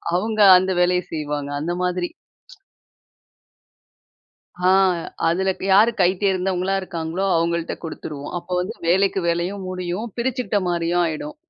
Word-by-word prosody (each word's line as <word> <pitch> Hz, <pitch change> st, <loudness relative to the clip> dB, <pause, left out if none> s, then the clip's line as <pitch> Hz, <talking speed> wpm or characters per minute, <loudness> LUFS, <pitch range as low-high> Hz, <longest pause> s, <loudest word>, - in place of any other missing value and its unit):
அவுங்க 215 Hz, +4 st, 0 dB, 0.2 s
அந்த 185 Hz, +1 st, 0 dB
வேலைய 180 Hz, 0 st, +2 dB
செய்வாங்க. 150 Hz, -2 st, -3 dB
அந்த 170 Hz, +3 st, -2 dB
மாதிரி. 180 Hz, -1 st, -1 dB, 2.6 s
ஆ. -, -, +6 dB, 0.6 s
அதில 190 Hz, +3 st, +1 dB
க் -, -, -7 dB
யாரு 215 Hz, +4 st, +6 dB
கை 180 Hz, -, +5 dB
தேர்ந்தவங்களா 190 Hz, 0 st, 0 dB
இருக்காங்களோ, 175 Hz, +1 st, -3 dB
அவங்கள்ட 170 Hz, 0 st, -1 dB
குடுத்துருவோம். 150 Hz, -3 st, -7 dB
அப்போ 175 Hz, +1 st, -11 dB
வந்து 180 Hz, -, -4 dB
வேலைக்கு 195 Hz, +2 st, +2 dB
வேலையும் 175 Hz, +4 st, -2 dB
முடியும். 185 Hz, +3 st, -4 dB
பிரிச்சிக்கிட்ட 235 Hz, -4 st, -1 dB
மாரியும் 175 Hz, 0 st, +1 dB
ஆயிடும். 290 Hz, -, -5 dB
180 Hz, 120 wpm, -21 LUFS, 170-195 Hz, 2.6 s, ஆ